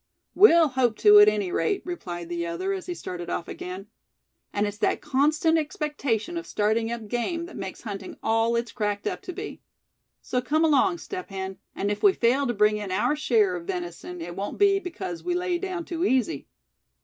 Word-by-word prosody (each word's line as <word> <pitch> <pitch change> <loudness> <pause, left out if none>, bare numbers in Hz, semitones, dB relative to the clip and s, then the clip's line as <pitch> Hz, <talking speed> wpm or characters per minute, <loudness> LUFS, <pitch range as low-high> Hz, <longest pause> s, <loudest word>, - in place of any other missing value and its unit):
"We'll 340 -6 +7
hope 245 -4 +1
to, 210 -1 +8
at 210 - +8
any 205 -4 -2
rate," 400 - 0
replied 175 - -5
the 170 0 -2
other, 375 - -2
as 380 -2 -5
he 355 - -3
started 175 - -6
off 170 - -3
again; 185 +2 -7 0.7
"and 205 +1 0
it's 205 0 -5
that 215 - +1
constant 305 +3 +2
expectation 300 -1 -2
of 335 - -5
starting 220 +2 0
up 235 -2 -5
game 285 - -2
that 350 - -11
makes 190 -1 -7
hunting 200 -4 -6
all 225 +1 +2
it's 235 0 -1
cracked 205 -2 -2
up - - -2
to 380 -1 -6
be. 405 +4 -7 0.6
So 250 - -2
come 310 +6 +2
along, 320 +4 +3
Step 370 +1 -7
Hen; 190 -1 -5 0.2
and 200 +1 -1
if 205 - -3
we 400 - +6
fail 260 +2 +2
to 240 - 0
bring 210 +1 +3
in 205 -2 -5
our 240 +10 +1
share 220 -10 +2
of 170 -1 -7
venison 175 -1 -5
it 175 +1 -6
won't 200 +1 -4
be 400 -1 +4
because 360 -1 -6
we 355 0 -1
lay 360 -1 0
down 370 -3 -4
too 340 -1 -3
easy. 265 -1 +1
240 Hz, 200 wpm, -26 LUFS, 205-335 Hz, 0.7 s, to